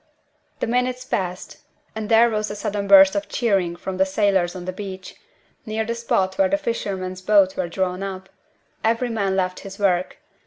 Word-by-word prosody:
The -, -, +1 dB
minutes 250 Hz, +1 st, -1 dB
passed, 185 Hz, -1 st, -4 dB, 0.4 s
and 220 Hz, -1 st, -5 dB
there 230 Hz, +1 st, +6 dB
rose 215 Hz, -1 st, -1 dB
a 205 Hz, -, -5 dB
sudden 205 Hz, -1 st, -3 dB
burst 195 Hz, -1 st, +8 dB
of 200 Hz, -, -2 dB
cheering 195 Hz, -7 st, 0 dB
from 185 Hz, +1 st, -6 dB
the 190 Hz, -, +3 dB
sailors 190 Hz, -3 st, +1 dB
on 180 Hz, -1 st, -7 dB
the 185 Hz, -, -4 dB
beach, 190 Hz, -1 st, -8 dB, 0.5 s
near 220 Hz, -1 st, -2 dB
the 230 Hz, -, -2 dB
spot 230 Hz, -2 st, -1 dB
where 290 Hz, -1 st, +4 dB
the 295 Hz, -, +2 dB
fishermen's 190 Hz, -9 st, -4 dB
boats 195 Hz, -1 st, +4 dB
were 180 Hz, -2 st, -2 dB
drawn 185 Hz, +1 st, -2 dB
up. 190 Hz, -1 st, -5 dB, 0.6 s
Every 230 Hz, +2 st, +1 dB
man 200 Hz, -4 st, -1 dB
left 185 Hz, -1 st, -1 dB
his 195 Hz, -1 st, -10 dB
work. 185 Hz, -3 st, 0 dB
195 Hz, 185 wpm, -22 LUFS, 185-220 Hz, 0.6 s, burst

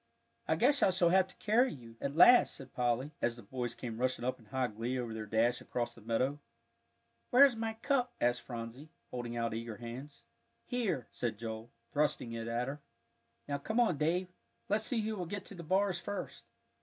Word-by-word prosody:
"I -, -, +3 dB
guess 280 Hz, +4 st, +4 dB
I -, -, +6 dB
shall 180 Hz, -2 st, +3 dB
have 190 Hz, +1 st, +4 dB
to 190 Hz, -, -17 dB
carry 240 Hz, +5 st, +3 dB
you," 115 Hz, -4 st, -11 dB
at 140 Hz, +1 st, -2 dB
last 245 Hz, +9 st, +7 dB
said 135 Hz, -2 st, -10 dB
Polly, 125 Hz, +3 st, 0 dB
as 120 Hz, -1 st, +1 dB
the 120 Hz, -, -10 dB
boys 125 Hz, -3 st, -4 dB
came 115 Hz, -2 st, -6 dB
rushing 130 Hz, -1 st, 0 dB
up 130 Hz, -, -1 dB
in 115 Hz, -, -18 dB
high 130 Hz, +3 st, 0 dB
glee 120 Hz, +3 st, -3 dB
over 120 Hz, -3 st, -3 dB
their 110 Hz, -1 st, -5 dB
dash 115 Hz, +3 st, +2 dB
across 120 Hz, -1 st, -3 dB
the 115 Hz, -, -15 dB
meadow. 125 Hz, +6 st, 0 dB, 0.9 s
"Where's 265 Hz, 0 st, +7 dB
my 225 Hz, 0 st, -2 dB
cup?" 250 Hz, +1 st, +1 dB
asked 120 Hz, 0 st, +2 dB
Phronsie, 120 Hz, +5 st, -7 dB, 0.2 s
holding 120 Hz, -1 st, -4 dB
out 115 Hz, -1 st, -1 dB
eager 115 Hz, -1 st, -5 dB
hands. 125 Hz, +5 st, -8 dB, 0.4 s
"Here," 210 Hz, -, -1 dB
said 115 Hz, -4 st, -2 dB
Joel, 110 Hz, +1 st, -6 dB, 0.2 s
thrusting 145 Hz, -5 st, +1 dB
it 115 Hz, 0 st, -4 dB
at 120 Hz, +2 st, -1 dB
her. 140 Hz, +2 st, -5 dB, 0.7 s
"Now 140 Hz, -1 st, -1 dB
come 220 Hz, -, -1 dB
on, 215 Hz, -11 st, +3 dB
Dave, 175 Hz, +4 st, +1 dB, 0.4 s
let's 215 Hz, +2 st, +2 dB
see 245 Hz, -, +1 dB
who 215 Hz, 0 st, -2 dB
will 180 Hz, -4 st, -4 dB
get 200 Hz, +2 st, -5 dB
to -, -, -6 dB
the 175 Hz, -, -8 dB
bars 185 Hz, +2 st, +1 dB
first." 200 Hz, 0 st, -5 dB
130 Hz, 200 wpm, -33 LUFS, 120-190 Hz, 0.9 s, last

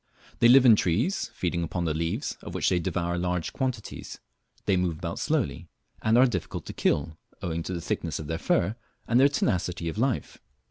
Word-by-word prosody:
They 120 Hz, -, +6 dB
live 130 Hz, +2 st, +7 dB
in 115 Hz, -3 st, +9 dB
trees, 110 Hz, -, 0 dB
feeding 90 Hz, -6 st, -2 dB
upon 85 Hz, +1 st, -2 dB
the 80 Hz, -, 0 dB
leaves, 85 Hz, -, -2 dB
of -, -, -8 dB
which -, -, +2 dB
they 90 Hz, -, +2 dB
devour 85 Hz, 0 st, -1 dB
large 90 Hz, -1 st, -2 dB
quantities, 130 Hz, -5 st, -4 dB, 0.5 s
they 100 Hz, -, +3 dB
move 90 Hz, -3 st, 0 dB
about 85 Hz, +1 st, -4 dB
slowly, 125 Hz, -, -1 dB, 0.3 s
and 110 Hz, +1 st, +3 dB
are 130 Hz, -, +7 dB
difficult 105 Hz, -9 st, -3 dB
to -, -, -7 dB
kill, 80 Hz, +2 st, 0 dB, 0.2 s
owing 85 Hz, -1 st, -2 dB
to 95 Hz, -, -4 dB
the 85 Hz, -, -3 dB
thickness 80 Hz, -2 st, -2 dB
of 80 Hz, -, -6 dB
their 80 Hz, +2 st, -3 dB
fur, 95 Hz, +6 st, +1 dB, 0.3 s
and 120 Hz, -, +4 dB
their 140 Hz, +2 st, +6 dB
tenacity 90 Hz, -10 st, -1 dB
of 90 Hz, -, -5 dB
life. 130 Hz, 0 st, -1 dB
90 Hz, 195 wpm, -27 LUFS, 85-120 Hz, 0.5 s, in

